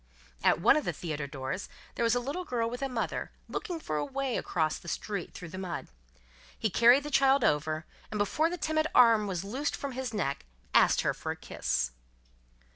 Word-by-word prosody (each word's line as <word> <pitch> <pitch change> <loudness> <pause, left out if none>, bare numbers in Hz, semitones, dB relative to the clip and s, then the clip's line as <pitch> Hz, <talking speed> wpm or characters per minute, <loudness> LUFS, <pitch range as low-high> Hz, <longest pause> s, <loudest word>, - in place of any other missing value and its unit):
At - - +4
one 225 - +6
of 305 - 0
the - - -1
theatre 150 -4 -4
doors, 140 +7 -4 0.2
there - - -5
was 230 0 +3
a - - +2
little 280 +9 -3
girl 240 -8 -1
with 245 +2 -5
a 275 - -1
mother, 235 -3 -2 0.2
looking 345 -3 -4
for 155 - -3
a 150 - 0
way 270 - -2
across 160 -3 0
the - - -14
street 200 +1 -3
through 170 - -7
the 185 - -7
mud. 180 -3 -5 0.7
He 220 - 0
carried 240 +7 +6
the 295 - -6
child 270 -1 +4
over, 155 0 +1 0.2
and 215 - -3
before 295 +11 +2
the 355 - -4
timid 310 -1 +1
arm 230 -4 +6
was 185 -2 -2
loosed 260 +9 -2
from 280 - -4
his 255 -1 -4
neck 140 - -2 0.3
asked - - +5
her - - +1
for - - -4
a - - -4
kiss. 60 0 -1
230 Hz, 205 wpm, -30 LUFS, 170-270 Hz, 0.7 s, one